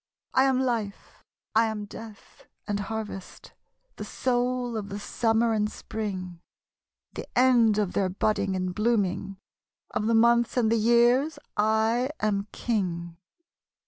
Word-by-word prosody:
I 260 - +4
am 265 -1 +2
Life, 230 -6 -3 0.3
I 225 +1 +4
am 215 -1 -4
Death, 215 0 -12 0.2
and 205 -1 -1
Harvest, 210 -2 -6 0.5
The - - -5
Soul 245 -1 -1
of 205 -2 -4
the 200 - -5
Summer 225 +2 +1
and 210 -1 +1
Sprmg, 185 -6 -5 0.7
The - - -7
end 240 -4 +5
of 205 -4 0
their 190 -2 +1
budding 195 0 0
and 185 -1 -2
blooming, 200 -3 0 0.5
Of 215 - -1
the 230 - +3
Months 235 +2 +3
and 225 -3 +3
the 230 - +3
Years 240 +7 +3 0.2
1 220 +4 +2
am 205 -1 0
King. 175 -7 -2
220 Hz, 135 wpm, -27 LUFS, 200-235 Hz, 0.7 s, end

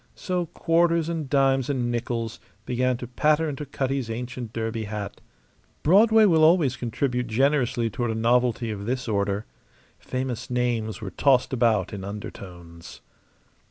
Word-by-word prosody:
So 180 -2 -2
quarters 165 0 +1
and 160 -5 -3
dimes 135 -2 +2
and 125 -4 0
nickels 115 -1 -3 0.3
began 125 0 0
to 125 - -7
patter 150 +5 +2
into 145 0 -5
Cutty's 135 -2 -2
ancient 120 0 -5
derby 115 -1 -3
hat. 105 -1 -6 0.6
Broadway 215 +6 +6
will 165 -5 +4
always 155 -6 +4
contribute 125 +1 -2
generously 125 0 +1
toward 120 +2 -2
a 110 - -1
novelty 120 0 +1
of 100 0 -6
this 125 0 -2
order. 100 -1 -1 0.5
Famous 130 -1 -4
names 120 -3 -1
were 100 -3 -5
tossed 130 +6 +2
about 115 -4 +1
in 100 -2 -6
undertones. 90 -4 -9
125 Hz, 140 wpm, -25 LUFS, 110-140 Hz, 0.6 s, Broadway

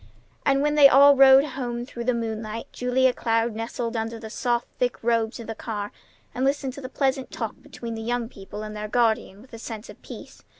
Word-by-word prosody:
And, 275 0 +3
when 295 0 +2
they 290 -2 +8
all 280 +1 +7
rode 270 +1 +7
home 245 -4 -4
through 235 -2 -7
the 250 0 +2
moonlight, 225 -1 -4
Julia 250 +1 +2
Cloud 230 0 0
nestled 230 +1 -4
under 225 +1 -3
the 220 -1 -9
soft, 240 0 -1
thick 250 -1 0
robes 230 0 0
of 230 - -7
the 225 - -5
car, 210 -2 -5 0.4
and 255 - -2
listened 275 -1 0
to 280 - -9
the 255 - -7
pleasant 265 -1 -1
talk - - -4
between 230 -1 -8
the 225 - -5
young 240 +1 -2
people 205 0 -9
and 215 0 -7
their 210 0 -4
guardian 220 -2 0
with 255 - -21
a 230 - -8
sense 225 -1 -8
of - - -18
peace. - - -11
235 Hz, 215 wpm, -25 LUFS, 225-260 Hz, 0.4 s, they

